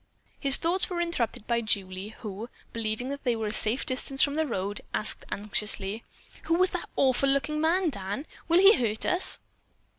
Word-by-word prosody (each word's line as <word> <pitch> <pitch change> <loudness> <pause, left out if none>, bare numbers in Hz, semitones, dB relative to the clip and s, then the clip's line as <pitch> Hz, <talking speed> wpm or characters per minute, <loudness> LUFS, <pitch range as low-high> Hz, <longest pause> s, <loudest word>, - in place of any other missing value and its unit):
His 275 -1 +4
thoughts 345 +3 0
were 355 -2 -3
interrupted 290 -12 -2
by 235 -1 0
Julie, 195 -2 -2
who, 215 +2 -7 0.2
believing 225 +2 -3
that 280 0 -6
they 245 -3 +1
were 225 -1 -4
a 210 - -2
safe 225 +5 +2
distance 270 0 +2
from 285 - +2
the 315 +1 -1
road, 200 -3 -3
asked 215 - +2
anxiously, 210 +1 -1 0.4
"Who 330 +1 +1
was 370 +2 +3
the - - -3
awful 270 +1 +2
looking 300 +3 -1
man, 335 +1 +1
Dan? 200 +5 -5 0.2
Will 335 +1 +3
he 390 +3 +8
hurt 220 -4 0
us?" 360 +1 +5
250 Hz, 180 wpm, -27 LUFS, 215-310 Hz, 0.4 s, he